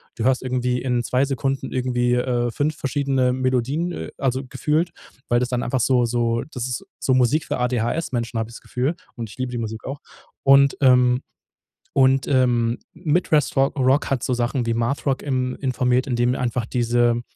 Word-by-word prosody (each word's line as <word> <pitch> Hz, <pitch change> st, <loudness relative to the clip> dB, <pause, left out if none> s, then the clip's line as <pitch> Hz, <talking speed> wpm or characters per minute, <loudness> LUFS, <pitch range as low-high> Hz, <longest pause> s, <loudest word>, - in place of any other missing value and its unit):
du 115 Hz, -, -3 dB
hörst 130 Hz, 0 st, +2 dB
irgendwie 125 Hz, -1 st, -1 dB
in 125 Hz, -2 st, 0 dB
2 125 Hz, +3 st, +1 dB
Sekunden 135 Hz, -1 st, -2 dB
irgendwie, 125 Hz, -1 st, +1 dB
äh, 125 Hz, -1 st, 0 dB
5 150 Hz, +5 st, -1 dB
verschiedene 135 Hz, -2 st, 0 dB
Melodien, 130 Hz, +6 st, 0 dB
äh, 80 Hz, -1 st, -6 dB
also, 130 Hz, 0 st, -1 dB
gefühlt, 150 Hz, +6 st, 0 dB, 0.4 s
weil 120 Hz, -, +3 dB
das 125 Hz, -, 0 dB
dann 125 Hz, -1 st, -1 dB
einfach 130 Hz, +2 st, -1 dB
so 125 Hz, 0 st, +3 dB
so 115 Hz, -1 st, 0 dB
das 125 Hz, -1 st, -4 dB
ist 125 Hz, +7 st, -4 dB, 0.2 s
so 130 Hz, -, +1 dB
Musik 130 Hz, +4 st, +2 dB
für -, -, -2 dB
ADHS-Menschen, 120 Hz, 0 st, -1 dB
habe 110 Hz, 0 st, -2 dB
ich 115 Hz, -, -12 dB
das -, -, -11 dB
Gefühl 130 Hz, +7 st, -2 dB, 0.2 s
und 115 Hz, -3 st, -6 dB
ich -, -, -13 dB
liebe 130 Hz, -1 st, -3 dB
die -, -, -2 dB
Musik 110 Hz, -1 st, -5 dB
auch. 140 Hz, +2 st, -5 dB, 0.4 s
Und, 140 Hz, 0 st, +5 dB
ähm 125 Hz, -1 st, +5 dB, 0.7 s
und, 135 Hz, 0 st, +3 dB
ähm, 120 Hz, -3 st, +2 dB
Midwest 160 Hz, -2 st, +1 dB
Ro 135 Hz, 0 st, +4 dB
Rock 135 Hz, +2 st, +2 dB
hat 130 Hz, -3 st, -1 dB
so 130 Hz, -, 0 dB
Sachen 120 Hz, +1 st, -1 dB
wie 115 Hz, -, 0 dB
Math-Rock, 130 Hz, +3 st, -1 dB
ähm, 130 Hz, -2 st, -1 dB
informiert, 125 Hz, -1 st, +1 dB
indem 120 Hz, -1 st, +1 dB
er -, -, -3 dB
einfach 120 Hz, -1 st, -1 dB
diese 120 Hz, 0 st, +1 dB
125 Hz, 185 wpm, -22 LUFS, 120-135 Hz, 0.7 s, Und